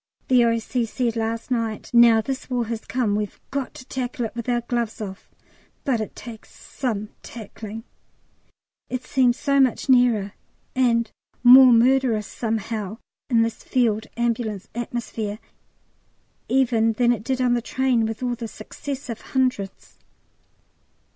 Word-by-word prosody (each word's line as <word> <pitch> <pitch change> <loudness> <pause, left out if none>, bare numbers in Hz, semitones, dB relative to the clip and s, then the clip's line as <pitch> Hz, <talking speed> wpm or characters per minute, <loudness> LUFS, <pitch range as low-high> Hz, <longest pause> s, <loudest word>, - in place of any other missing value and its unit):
The 250 -2 +6
O.C. 230 +1 0
said 235 0 -1
last 230 +2 -3
night, 225 -3 -2
"Now 235 -2 +7
this 265 +4 -5
War 245 -2 0
has 225 0 -5
come 235 -5 0
we've 210 -1 -3
got 275 -2 -3
to 255 - -10
tackle 250 -1 -3
it 220 - -6
with 235 +1 -5
our 240 -1 +1
gloves 235 -2 -2
off," 195 -3 -7 0.5
but 245 -5 +1
it 215 - -6
takes 230 -2 -10
some 215 -6 -4
tackling. 220 -1 -8 1.1
It 255 0 -4
seems 250 -2 +2
so 280 -1 +1
much 265 0 +2
nearer, 235 -6 +4 0.4
and 235 -3 +2 0.3
more 255 +1 +10
murderous 240 -2 +3
somehow 220 -2 -3 0.3
in 230 -3 +4
this 230 0 -3
Field 225 -4 +1
Ambulance 230 -4 -1
atmosphere 230 -3 -4 1.1
even 235 -4 +3
than 240 +2 +3
it 230 -3 -1
did 260 +1 -1
on 250 -1 +3
the 240 - +1
train 245 -2 +1
with 225 +2 -5
all 245 -1 0
the 235 -1 -5
successive 260 0 -7
hundreds. 255 -7 -2
235 Hz, 140 wpm, -23 LUFS, 220-255 Hz, 1.1 s, more